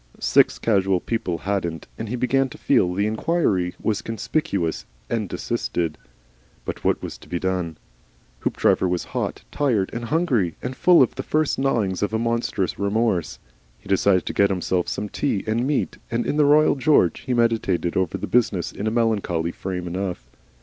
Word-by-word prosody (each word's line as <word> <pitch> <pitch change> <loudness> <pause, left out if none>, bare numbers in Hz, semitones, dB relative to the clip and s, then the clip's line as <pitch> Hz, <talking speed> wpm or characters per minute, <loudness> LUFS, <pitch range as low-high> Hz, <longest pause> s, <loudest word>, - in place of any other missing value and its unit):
Six - - +4
casual 95 -4 +2
people 90 -5 -2
hadn't, 85 -3 -2
and 110 - -6
he 125 - -2
began 130 +2 +1
to - - -11
feel 115 -10 +2
the 100 +3 0
inquiry 110 - 0
was 105 -3 -1
conspicuous, 110 - -2 0.2
and 110 -5 -1
desisted. 85 -9 -2 0.7
But - - -5
what - - +1
was - - -6
to - - -16
be 90 - -1
done? 90 -3 -2 0.6
Hoopdriver 95 - +2
was 90 -1 -1
hot, - - -2
tired, 120 -10 +1
and 115 0 -4
hungry, 125 - +1
and 125 +1 -5
full 175 -2 +6
of 125 - -1
the - - -4
first 155 -2 0
gnawings 110 -9 0
of 105 +2 0
a - - +3
monstrous 115 -5 -1
remorse. 100 -3 0 0.4
He - - -18
decided 95 -1 +3
to - - -3
get 100 0 +3
himself 90 -1 0
some 105 - -3
tea 105 -2 -1
and 115 +4 0
meat, 145 -1 -1
and 115 +1 -1
in - - -1
the 150 - +5
Royal 150 +2 +5
George 145 +2 +3
he 125 - -2
meditated 115 -7 +1
over 95 -3 0
the - - -4
business 105 -8 +1
in 105 - -4
a - - +3
melancholy 105 -8 0
frame 90 0 -5
enough. 90 -9 -4
105 Hz, 175 wpm, -23 LUFS, 90-120 Hz, 0.7 s, full